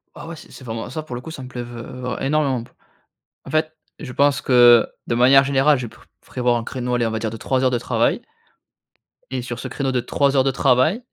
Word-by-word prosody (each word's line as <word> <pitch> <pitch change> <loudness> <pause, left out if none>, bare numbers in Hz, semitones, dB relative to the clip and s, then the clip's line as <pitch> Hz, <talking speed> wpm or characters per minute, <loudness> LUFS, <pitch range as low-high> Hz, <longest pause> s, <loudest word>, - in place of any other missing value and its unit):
Ah - - -10
ouais, 170 - -7
c'est 155 - -14
c'est - - -12
vraiment 115 -2 -5
ça, 155 +5 -5
pour 130 -5 -7
le 120 - -6
coup, 160 - -9
ça 140 -5 -8
me 125 - -8
plait 125 -1 -6
v 120 0 -10
heu, 125 +2 -9
vra 125 +1 -4
énormément 135 -4 0
p - - -18 0.7
en - - -10
fait, 155 0 0 0.2
je 130 -5 -8
pense 140 +2 +2
que 120 -3 +6 0.2
de - - -1
manière 130 +3 +6
générale, 140 +1 +3
je 125 - -4
pré 115 +3 -16 0.2
prévois 125 -1 0
un 115 - -6
créneau, 125 0 -3
allez, 120 -1 +1
on 115 - -1
va 110 - -2
dire 110 0 -3
de 115 - -7
3 130 +2 0
heures 130 - +3
de 120 - 0
travail 120 -1 0 1.1
et 130 -1 -2
sur 120 0 -6
ce - - -5
créneau 135 -2 -2
de 125 - 0
3 140 +3 0
heures 130 - +4
de 135 - +1
travail, 130 - +2
125 Hz, 260 wpm, -21 LUFS, 120-140 Hz, 1.1 s, que